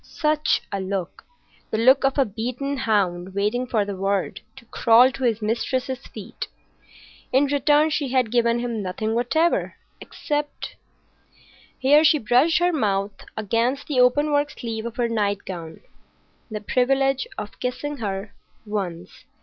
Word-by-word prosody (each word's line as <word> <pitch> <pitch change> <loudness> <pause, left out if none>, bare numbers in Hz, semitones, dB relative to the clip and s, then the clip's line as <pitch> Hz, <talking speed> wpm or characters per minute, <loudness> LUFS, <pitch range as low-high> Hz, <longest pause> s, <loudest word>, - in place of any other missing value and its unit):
Such 305 -1 0
a 200 - -2
look! 190 -1 -4 0.4
The - - -1
look 260 +5 +5
of 270 +1 +1
a 275 - +4
beaten 250 +6 -3
hound 190 -6 0
waiting 215 +5 0
for 220 -4 +1
the 200 -1 -4
word 195 0 -1
to 265 -3 -14
crawl 235 +3 +5
to 265 - -7
his 225 -2 0
mistress's 255 +4 -2
feet. - - -8 0.8
In 265 +3 +4
return 290 +2 +3
she 295 -2 0
had 255 -3 +1
given 235 -1 +2
him 240 -2 -3
nothing 210 +4 -3
whatever, 315 +8 +1 0.2
except—here 295 -1 -3
she 310 0 +5
brushed 260 +7 +3
her 355 0 +2
mouth 200 -7 0 0.2
against 230 +6 0
the 280 -4 -1
open 290 +5 +4
work 290 0 +2
sleeve 225 -4 -5
of 235 - -8
her 240 -1 0
nightgown—the 200 0 -6
privilege 270 +3 +1
of 210 -1 -7
kissing 290 +4 -3
her 200 -2 -4 0.3
once. 190 -1 -5
240 Hz, 140 wpm, -23 LUFS, 210-270 Hz, 0.8 s, look